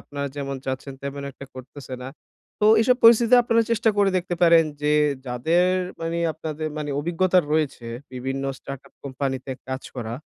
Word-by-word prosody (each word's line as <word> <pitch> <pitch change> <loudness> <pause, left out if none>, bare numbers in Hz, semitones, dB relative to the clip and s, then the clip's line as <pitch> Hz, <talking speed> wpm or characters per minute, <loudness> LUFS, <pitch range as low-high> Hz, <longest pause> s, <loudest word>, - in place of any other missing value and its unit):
আপনারা 140 0 -5
যেমন 140 -1 -3
চাচ্ছেন 130 +1 -4
তেমন 140 0 -5
একটা 135 - -11
করতেছে 130 +1 -9
না। 130 - -6 0.5
তো - - +2 0.2
এইসব 250 +2 +4
পরিস্থিতিতে 235 +1 +7
আপনারা 230 -1 +3
চেষ্টা 230 -1 +3
করে 200 -1 +4
দেখতে 175 0 -2
পারেন 165 -1 +6 0.2
যে 150 0 +2 0.3
যাদের 160 +9 +2 0.3
মানে 165 +1 -2
আপনাদের 155 0 -5
মানে 145 -1 -3
অভিজ্ঞতা 175 +4 +2
রয়েছে 145 -6 -1 0.3
বিভিন্ন 135 +2 -4 0.2
start 140 -1 -8
up - - -22
কোম্পানি 135 0 -2
তে 135 - -3 0.2
কাজ 130 0 -4
করা। 115 -1 -4
145 Hz, 170 wpm, -23 LUFS, 135-175 Hz, 0.5 s, পরিস্থিতিতে